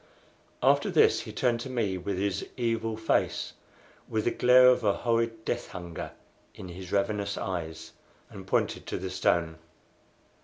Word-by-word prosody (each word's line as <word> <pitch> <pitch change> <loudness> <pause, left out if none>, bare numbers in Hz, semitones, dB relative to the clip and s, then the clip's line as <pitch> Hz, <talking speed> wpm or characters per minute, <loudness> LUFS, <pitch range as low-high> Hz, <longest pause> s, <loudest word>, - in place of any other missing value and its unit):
After - - +4
this - - +4
he - - -7
turned 120 -2 +1
to 130 - -6
me 115 -7 -1
with 95 +1 -3
his 100 0 -1
evil 115 -2 -1
face, 110 - 0 0.6
with 110 -1 -1
the 120 - +2
glare 125 +1 +6
of 125 -1 +3
a 100 -2 +3
horrid 115 -1 0
death 120 - -2
hunger 85 -2 -7 0.4
in 90 - -9
his 90 +1 -9
ravenous 100 0 0
eyes, 85 -5 -4 0.4
and - - -11
pointed - - 0
to - - -3
the 95 0 -5
stone. 85 -3 +1
100 Hz, 155 wpm, -28 LUFS, 95-115 Hz, 0.6 s, glare